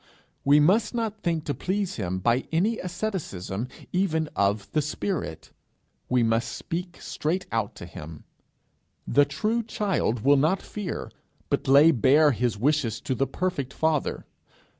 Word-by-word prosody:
We 145 +2 +6
must 210 +9 +3
not 220 -2 -2
think 165 -3 0
to 145 - -2
please 195 +3 -2
him 95 -4 -2
by 120 +7 +1
any 200 +8 +1
asceticism 165 - -4 0.3
even 160 -4 +1
of 100 +1 +1
the 155 - +2
spirit; 150 - -4 0.6
we 125 -1 +3
must 115 +1 +1
speak 175 +1 -5
straight 175 +5 -2
out 115 -3 -1
to - - -8
him. 80 -2 -10 0.8
The 145 0 +4
true 215 +11 -1
child 195 - -1
will 140 +4 +5
not 155 +8 +2
fear, 205 -4 -5 0.4
but - - 0
lay 140 +4 +7
bare 145 +4 +5
his 120 -3 -1
wishes 125 -2 +1
to - - -2
the 135 +2 0
perfect 140 -4 -3
Father. 160 -3 0
150 Hz, 145 wpm, -26 LUFS, 120-185 Hz, 0.8 s, lay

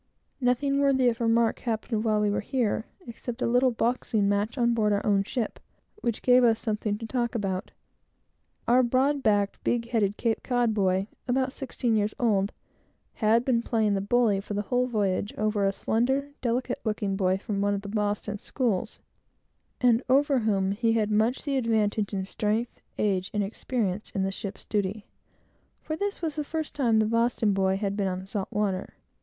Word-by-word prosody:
Nothing 275 +2 +1
worthy 265 -3 +4
of 235 0 -4
remark 230 0 +2
happened 220 -1 -2
while 215 -2 +2
we 210 -1 +2
were - - 0
here, 230 -1 -1 0.2
except 235 0 -7
a - - +2
little 245 +2 +3
boxing 230 -3 0
match 205 +5 0
on 235 -1 +3
board 215 -2 +2
our 200 0 0
own 200 -2 +3
ship, 225 +2 -3 0.4
which 235 - -3
gave 250 0 +6
us 230 -2 +4
something 210 -1 -2
to 225 - -7
talk 240 0 -2
about. 190 -4 -2 1.0
A 245 +2 +5
broad 265 +4 +2
backed, 205 -4 +1
big 235 -1 0
headed 210 -4 +1
Cape 230 -2 0
Cod 245 -3 +1
boy, 190 -2 +1 0.2
about 260 +1 0
sixteen 245 -3 -1
years 210 0 0
old, 205 -4 +2 0.6
had 225 +2 +2
been 240 -3 +2
playing 220 -3 +1
the 195 - 0
bully, 215 -1 +2
for 205 +1 -6
the 205 - -1
whole 250 +3 +1
voyage, 205 -3 -1
over 210 -2 +1
a - - +2
slender, 265 +8 0
delicate 245 0 -1
looking 210 -3 -1
boy, 190 -1 +1
from 200 0 -3
one 205 0 +1
of 200 - -5
the - - -7
Boston 205 0 -2
schools, 225 -5 -2 0.8
and 240 -1 +4
over 275 0 +4
whom 195 -4 +1
he 225 +3 +1
had 215 -2 +1
much 220 +4 +1
the 280 -3 -1
advantage, 220 -4 +1
in 190 -2 -2
strength, 215 +4 -2 0.2
age, 190 -3 0
and 205 - +2
experience 210 -1 -2
in 195 - -2
the 195 - 0
ship's 195 0 -7
duty, 205 0 -2 0.7
for 310 - -4
this 400 +1 -3
was 315 -3 -1
the 300 - 0
first 315 +1 -4
time 235 -6 +2
the 220 - +3
Boston 230 -1 +1
boy 190 0 +1
had 200 -1 -2
been 200 -2 0
on 185 0 -3
salt 195 0 -3
water. 200 -3 -2
220 Hz, 185 wpm, -27 LUFS, 205-245 Hz, 1.0 s, gave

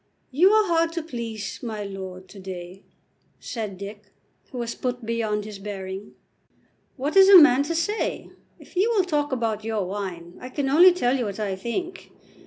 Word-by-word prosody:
"You 335 +9 +5
are 430 0 +4
hard 335 -2 +2
to 335 -2 -3
please, 230 -8 -6
my 220 -4 -4
lord, 190 -2 -8
to 200 - -12
day," 185 0 -8 0.6
said 215 -6 -5
Dick, 205 +2 -9 0.5
who 255 - -7
was 235 -1 -3
put 250 -2 -4
beyond 220 -2 -1
his 210 -2 -8
bearing. 195 -1 -7 0.8
"What 285 +6 -2
is 385 0 +8
a 395 - +11
man 280 -5 +7
to 315 +4 -2
say? 375 +7 -2 0.3
If - - -18
you 390 +6 +3
will 390 - +4
talk 295 -4 -1
about 225 -4 -1
your 220 -3 -2
wine, 180 -3 -6
I 255 - -7
can 270 +1 -2
only 345 +6 +8
tell 270 -8 +1
you 250 -3 -1
what 200 0 -5
I 200 -3 -2
think. 345 - -5
230 Hz, 185 wpm, -24 LUFS, 200-310 Hz, 0.8 s, a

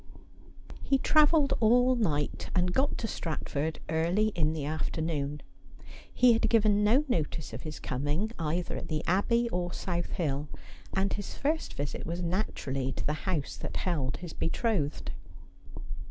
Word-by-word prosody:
He 275 - +2
travelled 300 0 +4
all 245 +3 +5
night 150 - -1
and 180 -1 +2
got 270 +6 +2
to 225 - -2
Stratford 160 -4 -3
early 170 +7 +2
in 160 -6 +1
the 155 -3 -3
afternoon. 150 -1 -2 0.7
He 250 -1 +6
had 225 - +2
given 210 -2 +4
no 245 +8 +4
notice 160 - -1
of - - -5
his 155 -1 -6
coming, 145 - -1
either 165 +2 -1
at - - -6
the 155 -1 -2
Abbey 235 +6 +2
or 175 -4 -2
South 175 -2 -2
Hill, 150 -5 -1 0.4
and 195 +1 0
his 205 -2 -4
first 310 +3 -1
visit 145 0 -3
was 170 +2 -3
naturaUy 135 -8 -1
to - - -4
the 150 - +1 0.2
house 155 -7 -1
that - - -5
held 145 -8 -1
his 175 -3 -8
betrothed. 165 -4 -1
175 Hz, 150 wpm, -30 LUFS, 150-220 Hz, 0.7 s, He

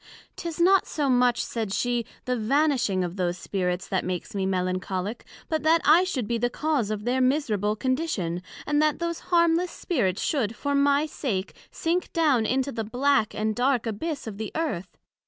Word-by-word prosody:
'Tis 335 -1 -5
not 380 +3 +5
so 295 -2 -1
much, 245 -1 +3
said 220 -4 -3
she, 240 +3 0 0.2
the 250 - 0
vanishing 240 -5 +1
of 175 +2 -5
those 180 -1 -1
Spirits 180 0 -2
that 190 - -1
makes 185 +5 -4
me 195 -2 -1
Melancholick, 185 +2 -2 0.2
but 315 -1 -1
that 320 +2 +4
I 330 +5 +6
should 260 - -2
be 235 +1 -1
the 245 +1 +1
cause 290 -5 0
of 210 0 -3
their 255 +2 +1
miserable 225 -7 +1
condition, 240 - -1 0.2
and 295 0 +2
that 305 -1 +2
those 335 -1 -3
harmless 340 0 +3
Spirits 215 - -1
should, 235 -7 0
for 285 +5 -2
my 280 +1 +3
sake, 215 -11 -3 0.2
sink 345 +2 -1
down 285 -9 +3
into 265 +1 0
the 230 -3 -3
black 250 +1 +1
and 215 0 -1
dark 250 0 +1
abyss 280 +8 -3
of 215 -2 -7
the 220 - -4
Earth. 195 - -3
245 Hz, 180 wpm, -26 LUFS, 205-300 Hz, 0.2 s, I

